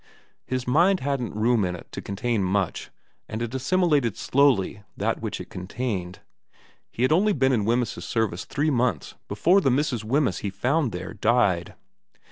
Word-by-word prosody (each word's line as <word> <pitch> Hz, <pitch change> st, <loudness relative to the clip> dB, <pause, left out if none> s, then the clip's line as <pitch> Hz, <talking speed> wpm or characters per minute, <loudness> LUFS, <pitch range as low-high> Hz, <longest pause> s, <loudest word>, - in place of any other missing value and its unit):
His 130 Hz, -1 st, -3 dB
mind 175 Hz, +9 st, +3 dB
hadn't 130 Hz, -6 st, -2 dB
room 115 Hz, 0 st, +2 dB
in 90 Hz, -1 st, -1 dB
it 90 Hz, -, -12 dB
to -, -, -6 dB
contain 105 Hz, +1 st, -1 dB
much, 95 Hz, -1 st, -1 dB, 0.4 s
and 110 Hz, -, -4 dB
it 120 Hz, +1 st, -4 dB
assimilated 145 Hz, -, +1 dB
slowly 130 Hz, -8 st, +2 dB, 0.2 s
that -, -, -1 dB
which -, -, -4 dB
it -, -, -9 dB
contained. 90 Hz, -1 st, -4 dB, 0.7 s
He 120 Hz, -, -3 dB
had 130 Hz, -, +3 dB
only 200 Hz, +6 st, +4 dB
been 135 Hz, -4 st, +2 dB
in 110 Hz, -6 st, +1 dB
Wemyss's 120 Hz, 0 st, 0 dB
service 110 Hz, -6 st, -1 dB
three 150 Hz, +2 st, 0 dB
months 125 Hz, -2 st, 0 dB
before 185 Hz, +4 st, +3 dB
the 135 Hz, -, +2 dB
Mrs. 125 Hz, -3 st, 0 dB
Wemyss 125 Hz, -, +1 dB
he 100 Hz, -, -3 dB
found 130 Hz, +7 st, 0 dB
there 90 Hz, +3 st, -6 dB
died. 105 Hz, -6 st, +1 dB
120 Hz, 165 wpm, -25 LUFS, 100-140 Hz, 0.7 s, only